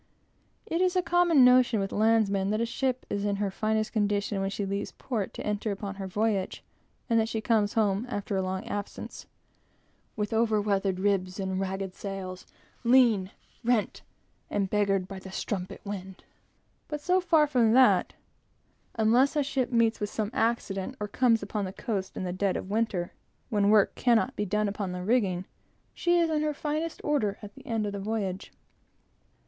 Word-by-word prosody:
It 335 +2 -1
is 370 0 +2
a 365 - +2
common 345 -7 +5
notion 250 -3 +5
with 195 0 -2
landsmen 210 -3 +2
that 215 +1 0
a 230 - +1
ship 255 +2 -2
is 200 0 -2
in 205 -1 0
her 200 -1 -1
finest 215 +1 -1
condition 205 -2 0
when 195 - 0
she 200 0 -3
leaves 200 +1 -3
port 220 -7 -3
to - - -6
enter 210 +1 -1
upon 200 0 -4
her 195 -1 -5
voyage; 205 0 -1 0.4
and 230 -2 +3
that 220 0 0
she 225 - -2
comes 215 -2 +1
home, 215 +1 +1
after 205 -3 -3
a 190 - +1
long 190 0 -3
absence, 205 0 -6 0.9
"With 210 0 -2
over 220 -1 +2
weathered 195 -2 0
ribs 190 -1 0
and 190 -1 -2
ragged 190 0 -3
sails; 190 -2 -6 0.4
Lean, 235 -6 +4 0.3
rent 235 -2 +1 0.5
and 195 -2 -1
beggared 195 -3 +1
by 190 0 -7
the 190 0 -10
strumpet 185 -1 -4
wind." 190 -2 -7 0.6
But 300 -1 -4
so 365 +5 +2
far 325 -4 +4
from 245 -6 +3
that, 260 +1 +5 0.8
unless 235 +6 +3
a 295 - +2
ship 265 -2 -1
meets 230 -1 +2
with 210 - -2
some 215 0 -3
accident, 225 -1 -1
or 210 - -3
comes 230 0 +2
upon 205 0 -3
the 185 - -6
coast 195 -5 -4
in - - -3
the 180 -1 -3
dead 190 0 0
of 190 - -6
winter, 210 -5 -1 0.4
when 205 -2 +3
work 210 -2 +5
cannot 245 +2 +2
be 210 - -1
done 210 +2 +1
upon 200 -2 -3
the 180 0 -5
rigging, 190 -5 +1 0.5
she 345 0 +2
is 340 -1 +3
in 305 -1 +1
her 305 -1 -1
finest 305 +3 -3
order 220 -9 0
at 205 0 -9
the - - -15
end 225 -2 -1
of 205 - -2
the 200 - -5
voyage. 195 -2 -3
210 Hz, 185 wpm, -28 LUFS, 195-235 Hz, 0.9 s, common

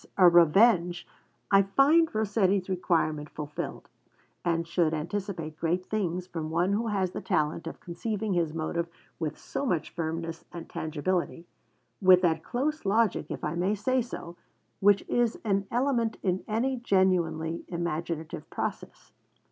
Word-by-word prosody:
'A 185 -2 +8
Revenge,' 175 +1 +4 0.5
I 195 0 +7
find 280 - +4
Rossetti's 200 -3 +1
requirement 160 -5 0
fulfilled, 150 -1 -6 0.6
and 165 -1 0
should 165 -2 +1
anticipate 165 -2 -4
great 175 +2 0
things 185 -4 -2
from 165 -4 -5
one 175 +4 +1
who 225 +3 0
has 195 -4 0
the - - -5
talent 160 -2 0
of - - -7
conceiving 210 +4 -3
his 170 -3 +1
motive 165 +1 -2 0.3
with 155 -2 -3
so - - -4
much 175 - -1
firmness 165 0 -4
and 170 -1 -8
tangibility 170 +2 -2 0.6
with 185 -1 +7
that 160 -2 +2
close 300 +5 -2
logic, 215 +1 +2
if - - -6
I 150 - -1
may 185 +5 +1
say 255 +5 +1
so, 175 -7 -7 0.4
which 200 0 +4
is 240 -2 +1
an 195 -2 +1
element 240 -2 0
in 185 -1 0
any 250 +5 0
genuinely 175 -7 +1
imaginative 170 -2 -4
process. - - -5
180 Hz, 140 wpm, -28 LUFS, 165-210 Hz, 0.6 s, A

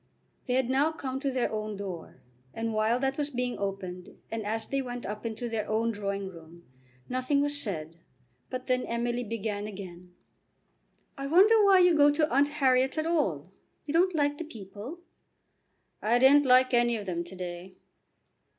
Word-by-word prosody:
They 250 - +1
had 260 -2 +2
now 275 +5 +2
come 265 -4 -5
to 280 0 -1
their 255 -2 -1
own 215 -1 -4
door, 185 -4 -8 0.3
and 225 0 -2
while 215 +2 +2
that 270 +2 -1
was 295 0 -1
being 250 -2 -3
opened 190 -2 -5 0.2
and 225 -1 -3
as 220 +1 -2
they 275 +3 -1
went 245 -1 -6
up 210 +3 -4
into 230 +2 -4
their 220 -2 -3
own 225 +2 +1
drawing 200 -2 -3
room, 170 -1 -13 0.4
nothing 255 +3 0
was 290 0 +2
said, 165 -5 -4 0.5
but 255 0 -5
then 255 -1 +1
Emily 240 +1 -1
began 210 -2 -3
again. 180 -3 -10 1.0
"I 275 - -3
wonder 410 +8 +6
why 390 -2 +6
you 355 -1 +5
go 290 -2 +6
to 305 0 +2
Aunt 280 +2 +4
Harriet's 265 -2 +2
at 310 - 0
all. 190 - -1 0.3
You 290 - -4
don't 360 +2 +3
like 290 -1 +1
the - - -3
people?" 225 - -9 1.0
"I 230 +3 +3
didn't 275 +3 +6
like 255 0 +5
any 240 0 +3
of 205 - -7
them 170 -2 -2
to 175 +2 -11
day." 180 0 -7
240 Hz, 180 wpm, -28 LUFS, 200-275 Hz, 1.0 s, wonder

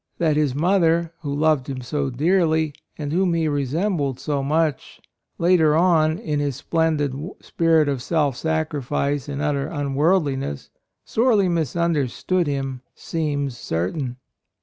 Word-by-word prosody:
That 160 -3 +2
his 145 -4 +1
mother, 170 0 +2
who 145 -3 -4
loved 145 -2 +1
him 130 -2 -4
so 140 +2 -2
dearly, 160 +2 +1 0.2
and 145 -1 -4
whom 180 -1 +2
he 165 -1 +1
resembled 145 0 -1
so 145 0 -1
much, 150 +1 -1 0.4
later 170 -3 +4
on, 160 -2 +3
in 150 -2 -2
his 145 -2 -1
splendid 155 -4 0 0.3
spirit 165 -2 +2
of 140 -3 -1
self 145 -2 0
sacrifice 145 -2 -1
and 145 +1 -3
utter 145 -2 0
unworldli 145 0 +1
ness, 70 - -6 0.3
sorely 220 -5 +2
misunderstood 170 +1 0
him 135 -2 -3
seems 145 -5 -2
certain. 120 - -3
150 Hz, 130 wpm, -22 LUFS, 140-165 Hz, 0.4 s, later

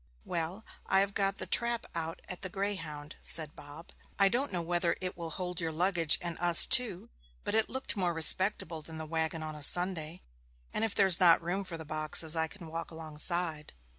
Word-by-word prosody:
'Well, 175 +5 -5 0.2
I 190 - +2
have 200 0 -3
got 195 -1 -2
the - - -5
trap 235 -1 -1
out 165 0 -7
at 180 - -9
the 185 - -7
Greyhound,' 165 -7 -7
said 155 -2 +3
Bob. 145 +3 -14 0.3
'I 195 -1 +3
don't 260 +7 -2
know 175 -3 -4
whether 175 0 -2
it 185 0 -6
will 170 -1 -7
hold 180 +2 -4
your 165 -1 -3
luggage 170 -1 +1
and 170 -1 -5
us 175 -1 +6
too; 240 - +1 0.3
but - - -5
it 220 0 0
looked 260 -2 -1
more 180 -4 -2
respectable 170 0 +5
than 160 +1 -11
the 160 - -7
waggon 160 0 -4
on 155 0 -7
a 150 - -12
Sunday, 175 +1 +1 0.5
and - - -2
if 220 -2 -2
there's 190 -4 +4
not 175 -3 +4
room 180 +4 -4
for 175 -3 -7
the 160 - -10
boxes 155 +1 +2
I 160 0 -1
can 175 +2 -14
walk 165 +1 -8
alongside.' 160 0 0
170 Hz, 200 wpm, -29 LUFS, 160-190 Hz, 0.5 s, us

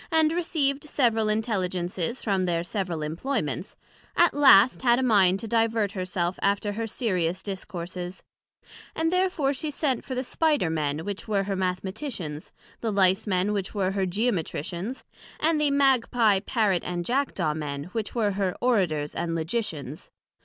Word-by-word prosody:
and 320 -1 +4
received 305 -5 0
several 230 -7 +1
Intelligences 190 -2 -1
from 195 -4 +1
their 170 -1 0
several 180 -4 -3
imployments; 165 - -3 0.4
at 345 0 +5
last 260 -5 +6
had 240 -2 +4
a 260 - 0
mind 195 -6 +4
to 225 - -6
divert 225 -2 +1
her 185 -2 -4
self 180 0 -2
after 200 +1 +1
her 225 +2 -3
serious 185 -7 -1
Discourses, 185 -2 -6 0.7
and 325 +2 0
therefore 365 -7 +1
she 300 +3 -4
sent 280 -4 -1
for 260 - -5
the 255 - -1
Spider 295 - +1
men, 155 0 -2
which 205 +1 -5
were 200 -2 +1
her 195 0 -2
Mathematicians, 185 - -4 0.3
the 225 - -2
Lice 195 +1 +3
men 190 +1 +1
which 200 0 -3
were 190 -2 +1
here 195 -1 0
Geometricians, 190 - -2 0.4
and 315 0 +2
the 295 - +3
Magpie 245 -7 +3
Parrot 210 -7 +1
and 175 -1 -3
Jackdaw 220 - 0
men, 145 -2 -4
which 225 -1 -3
were 215 -4 +2
her 190 -2 -1
Orators 175 -12 +1
and 165 -1 -2
Logicians. 160 - -3
200 Hz, 155 wpm, -26 LUFS, 180-250 Hz, 0.7 s, last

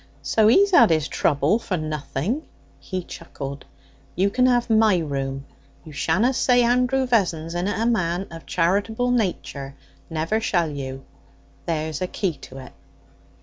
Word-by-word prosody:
'So 220 -1 +3
he's 390 - +5
had 240 - +7
his 155 -2 +1
trouble 145 +8 +1
for 185 -5 -3
nothing,' 155 - -3 0.4
he 185 -1 -5
chuckled. 140 -5 -8 0.5
'You 195 +3 +1
can 250 +3 +3
have 245 -1 +2
my 220 -3 +4
room. 135 -4 -3 0.4
You 155 - -10
shanna 210 - +1
say 245 -1 +3
Andrew 250 +2 +2
Vessons 175 -9 0
inna 180 +4 -1
a 225 - 0
man 185 -5 0
of 165 -1 -10
charitable 205 +8 +1
nature. 160 - -2 0.3
Never 165 +7 -1
shall 175 -7 0
you! 135 -2 -6 0.6
There's 160 -2 -2
a 185 - 0
key 185 -1 -2 0.2
to 130 - -11
it.' 130 -1 -11
180 Hz, 150 wpm, -23 LUFS, 155-225 Hz, 0.6 s, had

